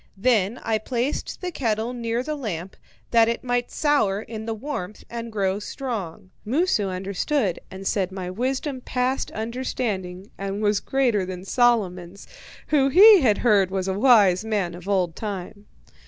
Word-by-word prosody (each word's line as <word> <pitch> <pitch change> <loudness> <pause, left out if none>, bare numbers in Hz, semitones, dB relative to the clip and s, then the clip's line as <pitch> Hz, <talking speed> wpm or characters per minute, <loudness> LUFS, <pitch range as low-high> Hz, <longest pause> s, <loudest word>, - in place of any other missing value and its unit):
Then 220 0 +2
I 220 -1 0
placed 245 +5 -3
the 365 -1 -3
kettle 230 -4 -1
near 235 0 -2
the 305 +2 -3
lamp, 190 - -5 0.4
that 230 -1 +5
it 235 - -2
might 245 -1 -1
sour 280 -10 +1
in 220 -1 -7
the 225 - -1
warmth 215 -5 -6
and 230 -1 -5
grow 195 -2 0
strong. 205 -7 -6
Moosu 245 - +1
understood, 195 - -1
and 190 +1 -9
said 190 -2 0
my 190 -1 -5
wisdom 260 +5 -2
passed 250 +1 -1
understanding 215 -5 -4
and 195 +1 -3
was 210 -1 +2
greater 245 -7 +1
than 185 0 -6
Solomon's, 195 -6 +1 0.4
who 275 -3 +3
he 395 +5 +8
had 220 -6 +3
heard 200 -5 +4
was 190 0 -2
a 190 - 0
wise 205 -4 +5
man 205 -6 -1
of 180 +3 -9
old 180 -4 +1
time. 205 0 -6
215 Hz, 155 wpm, -24 LUFS, 190-250 Hz, 0.4 s, he